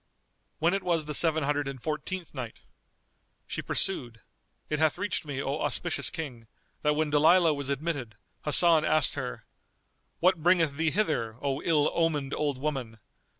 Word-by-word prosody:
When 170 +3 +2
it 195 - 0
was 165 -4 0
the 150 - -4
Seven 160 0 +3
Hundred 145 0 0
and 135 -1 -6
Fourteenth 160 +6 -5
Night, 125 -5 -7 0.8
She - - -4
pursued, 120 -11 0 0.5
It 150 - -2
hath 155 -1 +2
reached 205 -5 -2
me, 140 -2 -4
O 140 +3 -2
auspicious 175 - 0
King, 125 -8 -7 0.3
that 150 0 +2
when 155 0 0
Dalilah 160 +3 +5
was 140 -1 -5
admitted, 140 -6 -3 0.3
Hasan 160 +1 +6
asked 155 -2 +2
her, - - -6 0.7
"What 180 -1 +3
bringeth 165 -4 +3
thee 160 +2 +1
hither, 145 - -1
O 140 0 -2
ill 150 -3 +2
omened 150 -5 0
old 145 -3 -1
woman? 130 -5 -4
150 Hz, 155 wpm, -28 LUFS, 140-165 Hz, 0.8 s, Hasan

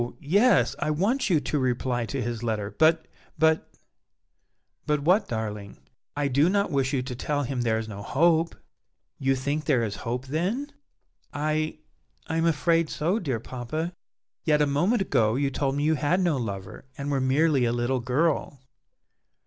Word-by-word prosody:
yes, 205 - +3
I 150 - -1
want 205 - +1
you 165 -4 +4
to 150 - -1
reply 125 -2 -1
to 135 0 -3
his 120 -1 -3
letter, 110 -3 -2
but 160 +1 +4 0.3
but 160 0 +2 0.5
" - - -50
"But 150 -1 +1
what, 180 +8 +3
darling?" 105 -3 -5 0.4
"I 145 -1 +1
do 140 +5 +3
not 200 +1 +1
wish 135 -2 +1
you 135 -3 0
to 125 0 -5
tell 145 +3 -1
him 130 -1 -2
there 115 -2 +1
is 110 0 -4
no 100 -2 -7
hope!" 165 +8 +2 0.6
"You 135 0 +2
think 140 +4 -2
there 130 -6 +2
is 105 -3 -3
hope, 125 +3 -4
then?" 190 - -2 0.6
"I 155 +1 -1 0.5
I 160 - -2
am 165 +1 +2
afraid 165 0 +2
so, 175 +8 0
dear 135 - -2
papa!" 130 +9 -4 0.5
"Yet 150 -2 +3
a 150 - +4
moment 175 +11 +1
ago 115 - +2
you 140 +1 0
told 135 0 -1
me 145 - -1
you 155 +1 +3
had 155 +4 +1
no 175 -5 +2
lover, 100 -3 -6
and 140 0 -3
were 135 -2 +1
merely 135 0 +3
a 115 - +1
little 120 +2 0
girl!" 140 +3 0
145 Hz, 175 wpm, -26 LUFS, 125-160 Hz, 0.6 s, you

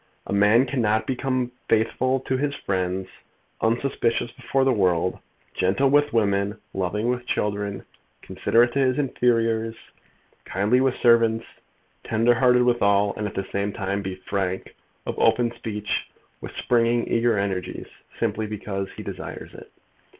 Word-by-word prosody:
A - - -4
man 105 +5 +5
cannot 110 -5 0
become 130 -1 -1 0.2
faithful 125 +4 +1
to 130 - -2
his 140 +2 -1
friends, 95 -1 -2 0.5
unsuspicious 115 0 0
before 135 +2 -1
the 130 -1 +3
world, 90 -4 +1 0.3
gentle 100 +9 +2
with 145 0 +4
women, 100 -1 +1 0.2
loving 95 +4 -1
with 125 0 -2
children, 100 -3 -2 0.4
considerate 120 +1 +2
to 140 - 0
his 130 -1 +2
inferiors, 115 -4 +1 0.7
kindly 105 +7 +1
with 130 -1 +2
servants, 115 -2 +3 0.6
tender 115 +2 +3
hearted 125 0 +4
with 120 -1 +2
all, 100 0 +3
and 105 - -3
at - - -8
the 95 - -2
same 100 +1 -1
time 100 -1 -2
be 95 -1 -4
frank, 95 0 -3 0.3
of - - -2
open 120 -1 +3
speech, 105 -3 -3 0.3
with - - -8
springing 120 0 +1
eager 115 -1 +2
energies, 95 -3 -3 0.3
simply 110 0 -1
because 100 -2 -4
he - - -8
desires - - -7
it. - - -13
115 Hz, 145 wpm, -24 LUFS, 100-125 Hz, 0.7 s, man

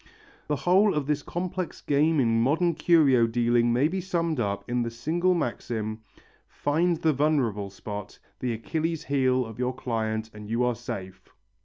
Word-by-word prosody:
The 150 - 0
whole 190 +6 +3
of 150 -2 0
this 150 0 0
complex 180 +3 -4
game 150 +2 +2
in 115 -3 +3
modern 165 +7 +2
curio 140 -9 +4
dealing 120 0 +2
may 125 +5 +3
be 185 +3 -3
summed 170 -5 -1
up 100 -2 -2
in 120 0 0
the 115 - -1
single 165 +10 0
maxim: 110 -6 -3 0.5
"Find 165 +4 0
the 160 -1 +2
vulnerable 130 -9 +1
spot, 105 +1 -7 0.2
the 125 - -1
Achilles' 160 +7 -2
heel 130 -2 +1
of 115 +1 -10
your 125 0 -1
client, 110 -3 -2
and 105 -1 -10
you 115 +2 +1
are 125 0 +2
safe." 110 -6 -7
130 Hz, 165 wpm, -26 LUFS, 115-160 Hz, 0.5 s, curio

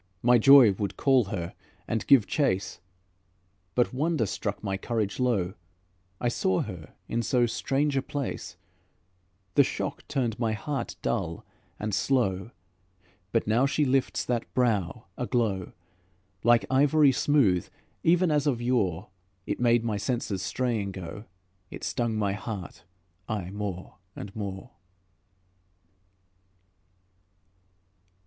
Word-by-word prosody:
My 120 0 +6
joy 135 -2 +8
would 100 0 -4
call 135 -4 +4
her 90 -3 -4 0.3
and 110 - -2
give 130 -7 +6
chase, 100 - 0 1.0
But 125 0 +2
wonder 150 -2 +1
struck 100 +1 -4
my 95 -2 -1
courage 105 +1 -2
low; 105 -8 +1 0.7
I 120 - 0
saw 95 -6 +1
her 90 -7 -8
in 120 - -1
so 125 0 +2
strange 140 +4 0
a 135 - +2
place, 140 0 -5 1.0
The - - +6
shock - - -4
turned 120 -5 -1
my 115 -3 +1
heart 135 +3 -4
dull 65 - -2 0.3
and 105 -1 -3
slow. 100 -3 +1 0.8
But 115 - +1
now 115 +6 +3
she 150 +2 +1
lifts 135 0 +1
that 120 -2 -2
brow 105 -9 0
aglow, 115 -7 -1 0.7
Like 120 0 +5
ivory 140 +2 +4
smooth, 125 - +2 0.3
even 175 0 +3
as 150 -1 +2
of 130 -5 +1
yore, 110 -9 0 0.4
It - - -3
made 120 -1 +3
my 110 -3 -1
senses 110 -4 -2
straying 110 -1 -1
go, 95 +4 -7 0.4
It - - -9
stung 115 -2 -1
my 100 -2 0
heart 100 -2 -7 0.4
aye 95 -4 -3
more 100 -3 -6 0.2
and 100 0 -8
more. 100 +2 -6
115 Hz, 125 wpm, -27 LUFS, 100-130 Hz, 1.0 s, joy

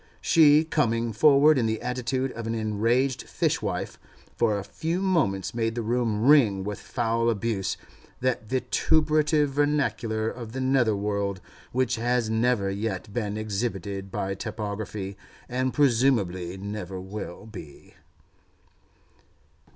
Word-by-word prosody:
She, 155 -1 +5
coming 115 -8 0
forward 145 +4 +5
in 115 - +1
the 110 0 -1
attitude 125 +1 -2
of 115 -1 -6
an 115 - -1
enraged 115 +4 +1
fishwife, - - -1 0.4
for 110 -3 +2
a 100 - -4
few 165 - -3
moments 160 - 0
made 115 -1 -1
the 120 - -2
room 115 -2 0
ring 120 -10 +5
with 105 0 -4
foul 115 -1 0
abuse, 105 -3 -1 0.4
that 125 -4 -1
vituperative 150 +2 +2
vernacular 135 -6 0
of 115 -1 -6
the 130 - -4
nether 130 -4 +2
world, 100 -1 -2 0.3
which 125 -1 0
has 120 -1 0
never 110 -3 +1
yet 100 0 -4
been 105 -3 -2
exhibited 100 -2 -3
by 95 +1 -2
typography, 100 -1 -5 0.3
and 130 +1 -1
presumably 110 - +2
never 100 -1 -5
will 95 0 -7
be. 90 -10 -12
115 Hz, 125 wpm, -26 LUFS, 100-130 Hz, 0.4 s, She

